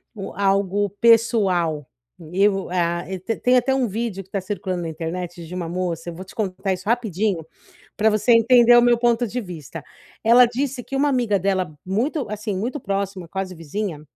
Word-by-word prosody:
u 195 Hz, -2 st, -7 dB
algo 200 Hz, +1 st, +1 dB
pessoal. 195 Hz, -, +3 dB, 0.5 s
Eu 195 Hz, 0 st, +2 dB
a 175 Hz, -1 st, 0 dB, 0.2 s
te 225 Hz, +5 st, -3 dB
tem 250 Hz, +1 st, +3 dB
até 260 Hz, +2 st, +2 dB
um 265 Hz, -2 st, +1 dB
vídeo 210 Hz, -2 st, -4 dB
que 190 Hz, -, -28 dB
está 195 Hz, -, -2 dB
circulando 185 Hz, -2 st, -4 dB
na 165 Hz, -, -3 dB
internet 170 Hz, +2 st, -5 dB
de 165 Hz, -, -10 dB
uma 180 Hz, -2 st, -4 dB
moça, 175 Hz, -1 st, -3 dB
eu 170 Hz, -, -8 dB
vou 185 Hz, -, -8 dB
te -, -, -14 dB
contar 195 Hz, -2 st, -2 dB
isso 185 Hz, +1 st, -8 dB
rapidinho, 210 Hz, -7 st, 0 dB, 0.5 s
pra 220 Hz, +1 st, +3 dB
você 215 Hz, +3 st, +2 dB
entender 240 Hz, +1 st, +6 dB
o 240 Hz, -, +7 dB
meu 240 Hz, -1 st, +4 dB
ponto 240 Hz, 0 st, +2 dB
de 240 Hz, +3 st, -3 dB
vista. 165 Hz, -, -8 dB, 0.4 s
Ela 240 Hz, +3 st, +7 dB
disse 255 Hz, +2 st, -3 dB
que -, -, -8 dB
uma 285 Hz, +2 st, +2 dB
amiga 240 Hz, -7 st, +1 dB
dela 185 Hz, -3 st, -1 dB
muito 250 Hz, -, -1 dB
assim, 210 Hz, 0 st, -4 dB
muito 240 Hz, +9 st, -3 dB
próxima, 195 Hz, -3 st, -3 dB
quase 190 Hz, +1 st, -4 dB
vizinha, 165 Hz, 0 st, -5 dB
200 Hz, 185 wpm, -22 LUFS, 180-235 Hz, 0.5 s, o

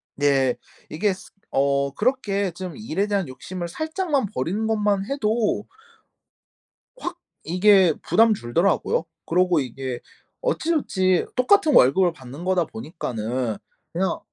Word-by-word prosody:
네. 135 Hz, -3 st, +2 dB, 0.3 s
이게 195 Hz, +6 st, 0 dB
스 185 Hz, 0 st, -13 dB, 0.2 s
어 140 Hz, 0 st, +1 dB
그렇게 205 Hz, -6 st, 0 dB
좀 180 Hz, 0 st, -7 dB
일에 200 Hz, -2 st, -2 dB
대한 200 Hz, -5 st, 0 dB
욕심을 175 Hz, +7 st, -6 dB
살짝만 315 Hz, -, -1 dB
버리는 185 Hz, +12 st, -1 dB
것만 210 Hz, -3 st, +1 dB
해도 220 Hz, -5 st, 0 dB, 1.3 s
확 355 Hz, -4 st, -5 dB, 0.3 s
이게 185 Hz, 0 st, +5 dB
부담 225 Hz, 0 st, +4 dB
줄더라고요. 170 Hz, -, +1 dB, 0.2 s
그러고 180 Hz, -1 st, +2 dB
이게 130 Hz, -1 st, -4 dB, 0.4 s
어찌저찌 300 Hz, -, +1 dB
똑같은 315 Hz, +4 st, +4 dB
월급을 175 Hz, -, +5 dB
받는 135 Hz, +2 st, -10 dB
거다 185 Hz, -2 st, +2 dB
보니까는 120 Hz, -, -4 dB, 0.4 s
그냥 185 Hz, +3 st, 0 dB
185 Hz, 255 characters per minute, -23 LUFS, 140-215 Hz, 1.3 s, 이게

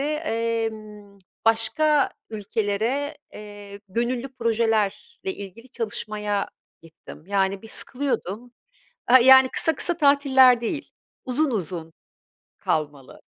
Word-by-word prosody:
emm, 225 Hz, -8 st, -3 dB, 0.3 s
başka 225 Hz, +7 st, +2 dB, 0.2 s
ülkelere, 220 Hz, +7 st, -2 dB
eee, 205 Hz, -1 st, -11 dB
gönüllü 240 Hz, +5 st, -2 dB
projelerle 225 Hz, -4 st, +1 dB, 0.4 s
ilgili 205 Hz, -, -11 dB
çalışmaya 210 Hz, -3 st, -3 dB, 0.3 s
gittim. 160 Hz, -1 st, -14 dB
Yani, 195 Hz, -1 st, 0 dB
bir 225 Hz, -, -12 dB
sıkılıyordum, 245 Hz, -3 st, -2 dB, 0.6 s
aaa, 255 Hz, +2 st, +7 dB
yani 265 Hz, +1 st, +7 dB
kısa 320 Hz, +4 st, +1 dB
kısa 345 Hz, +4 st, +2 dB
tatiller 270 Hz, -4 st, +5 dB
değil, 290 Hz, +6 st, -4 dB, 0.3 s
uzun 270 Hz, +2 st, 0 dB
uzun 170 Hz, -5 st, -4 dB, 0.6 s
kalmalı. 145 Hz, -4 st, -3 dB
225 Hz, 95 wpm, -23 LUFS, 205-260 Hz, 0.6 s, aaa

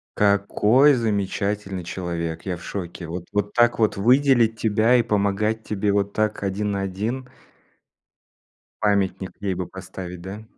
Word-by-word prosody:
Какой 105 Hz, +7 st, +4 dB
замечательный 100 Hz, -3 st, -2 dB
человек, 85 Hz, -2 st, -4 dB
я 90 Hz, -2 st, -2 dB
в 90 Hz, -, -13 dB
шоке, 90 Hz, -3 st, -6 dB
вот 85 Hz, +1 st, -6 dB
вот 105 Hz, 0 st, -1 dB
так 120 Hz, 0 st, +3 dB
вот 110 Hz, -2 st, +1 dB
выделить 120 Hz, 0 st, +4 dB
тебя 110 Hz, +2 st, +3 dB
и 120 Hz, -, +4 dB
помогать 105 Hz, +1 st, 0 dB
тебе 105 Hz, -1 st, -1 dB
вот 100 Hz, 0 st, 0 dB
так 110 Hz, 0 st, 0 dB
один 100 Hz, +2 st, -1 dB
на 100 Hz, -1 st, -1 dB
один. 110 Hz, +7 st, -3 dB, 1.5 s
Памятник 100 Hz, -2 st, 0 dB
ей 95 Hz, -2 st, -1 dB
бы 90 Hz, 0 st, -3 dB
поставить, 95 Hz, -1 st, -8 dB
да? 100 Hz, +4 st, -8 dB
100 Hz, 140 wpm, -23 LUFS, 95-110 Hz, 1.5 s, Какой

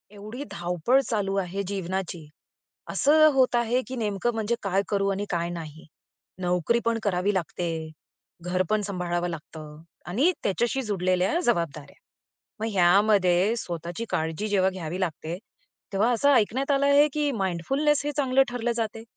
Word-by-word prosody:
एवढी 215 Hz, +7 st, -7 dB
धावपळ 175 Hz, +9 st, +1 dB
चालू 205 Hz, -6 st, -1 dB
आहे 195 Hz, +1 st, -2 dB
जीवनाची. 185 Hz, -4 st, -4 dB, 0.6 s
असं 310 Hz, +2 st, +4 dB
होत 260 Hz, -2 st, +3 dB
आहे, 240 Hz, +2 st, +2 dB
की 260 Hz, -, -5 dB
नेमकं 220 Hz, 0 st, -1 dB
म्हणजे 225 Hz, +1 st, -1 dB
काय 195 Hz, 0 st, +1 dB
करू 200 Hz, -1 st, +1 dB
आणि 200 Hz, +1 st, -2 dB
काय 170 Hz, -1 st, -1 dB
नाही? 160 Hz, -2 st, -8 dB, 0.6 s
नोकरी 180 Hz, +6 st, +1 dB
पण 230 Hz, 0 st, +1 dB
करावी 195 Hz, 0 st, +1 dB
लागते, 165 Hz, -3 st, -3 dB, 0.5 s
घर 180 Hz, +2 st, 0 dB
पण 215 Hz, 0 st, +2 dB
सांभाळावं 175 Hz, -3 st, -2 dB
लागतं 155 Hz, -2 st, -9 dB, 0.3 s
आणि 255 Hz, -, +3 dB
त्याच्याशी 240 Hz, +7 st, 0 dB
जुडलेल्या 185 Hz, -, 0 dB
जबाबदाऱ्या. 160 Hz, -10 st, -1 dB, 0.6 s
मग 220 Hz, +1 st, -2 dB
ह्यामध्ये 195 Hz, +1 st, +4 dB
स्वतःची 175 Hz, +2 st, -5 dB
काळजी 160 Hz, +6 st, -2 dB
जेव्हा 190 Hz, -2 st, +2 dB
घ्यावी 180 Hz, -2 st, -5 dB
लागते, 165 Hz, -1 st, -3 dB, 0.6 s
तेव्हा 210 Hz, +5 st, +2 dB
असं 285 Hz, +5 st, +4 dB
ऐकण्यात 255 Hz, +4 st, +2 dB
आलं 280 Hz, 0 st, +2 dB
आहे 285 Hz, +1 st, +6 dB
की 295 Hz, -1 st, 0 dB
माइंडफुलनेस 270 Hz, -, 0 dB
हे 295 Hz, -, 0 dB
चांगलं 270 Hz, -1 st, +4 dB
ठरलं 240 Hz, -1 st, -2 dB
जाते. 225 Hz, -1 st, -3 dB
195 Hz, 145 wpm, -26 LUFS, 175-235 Hz, 0.6 s, आहे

